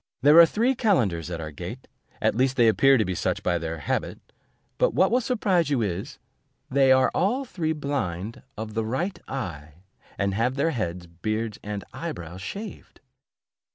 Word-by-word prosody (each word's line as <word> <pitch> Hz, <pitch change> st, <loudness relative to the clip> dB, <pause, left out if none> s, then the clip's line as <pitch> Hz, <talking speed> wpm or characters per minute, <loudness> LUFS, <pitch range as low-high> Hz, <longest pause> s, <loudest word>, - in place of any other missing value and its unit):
There 150 Hz, +4 st, +8 dB
are 170 Hz, -, +10 dB
three 235 Hz, +9 st, +1 dB
calenders 120 Hz, -, +1 dB
at 85 Hz, -2 st, -4 dB
our 80 Hz, -1 st, -5 dB
gate, 70 Hz, -, -8 dB, 0.4 s
at -, -, +3 dB
least 130 Hz, +3 st, +1 dB
they 120 Hz, -2 st, +5 dB
appear 135 Hz, +5 st, +5 dB
to 110 Hz, -, +2 dB
be 95 Hz, -, -2 dB
such -, -, -1 dB
by 85 Hz, -1 st, +1 dB
their 80 Hz, 0 st, -4 dB
habit; 75 Hz, -, -2 dB, 0.6 s
but -, -, +2 dB
what 190 Hz, -, +4 dB
will 250 Hz, +2 st, +3 dB
surprise 195 Hz, -, +1 dB
you 135 Hz, -5 st, +1 dB
is, 95 Hz, -2 st, -4 dB, 0.5 s
they 135 Hz, 0 st, +4 dB
are 130 Hz, 0 st, +5 dB
all 245 Hz, +9 st, +1 dB
three 160 Hz, -9 st, -2 dB
blind 115 Hz, -, -3 dB, 0.2 s
of 110 Hz, 0 st, -5 dB
the 110 Hz, 0 st, -1 dB
right 145 Hz, -, -2 dB
eye, 85 Hz, -, -6 dB, 0.3 s
and 100 Hz, -1 st, 0 dB
have 115 Hz, +5 st, 0 dB
their 145 Hz, +4 st, +1 dB
heads, 90 Hz, -, -3 dB
beards, 110 Hz, +6 st, -3 dB
and 105 Hz, -2 st, -5 dB
eye -, -, -4 dB
brows 90 Hz, +2 st, -9 dB
shaved. 205 Hz, -, -8 dB
115 Hz, 180 wpm, -25 LUFS, -, 0.6 s, are